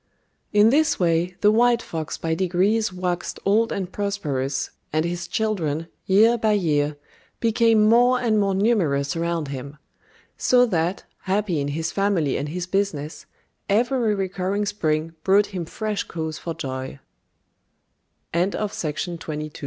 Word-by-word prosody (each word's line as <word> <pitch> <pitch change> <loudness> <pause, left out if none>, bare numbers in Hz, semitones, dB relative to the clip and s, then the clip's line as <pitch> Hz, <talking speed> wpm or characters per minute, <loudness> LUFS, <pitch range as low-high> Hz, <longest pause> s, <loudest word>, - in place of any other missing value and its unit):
] - - -47
In 210 +2 +5
this 305 +3 +2
way 175 0 +1
the 210 - +5
white 240 +1 +4
fox 160 -2 -5
by 165 0 -2
degrees 190 +5 +1
waxed 180 -1 -3
old 220 +3 +3
and 190 -2 -3
prosperous, 145 -11 -2 0.2
and 155 +1 +1
his 175 +1 -3
children, 170 -7 -1 0.2
year 225 +5 +5
by 215 -1 +2
year, 150 -6 +1 0.4
became 225 -1 +3
more 245 +3 +5
and 225 -3 +2
more 195 -1 +1
numerous 170 -10 +1
around 165 -3 -2
him; 140 +2 -7 0.6
so 250 0 +5
that, 180 -3 -1 0.2
happy 190 -4 0
in 140 - -2
his 160 +3 -2
family 195 -8 +1
and 145 +2 -3
his 175 +3 -3
business, 180 -6 -2 0.4
every 230 +1 +2
recurring 195 +1 -1
spring 160 -6 -1
brought 200 +1 +3
him 175 -3 -3
fresh 210 +4 -3
cause 160 -2 -5
for 165 -1 -5
joy. 130 0 -5
185 Hz, 135 wpm, -23 LUFS, 160-215 Hz, 0.6 s, In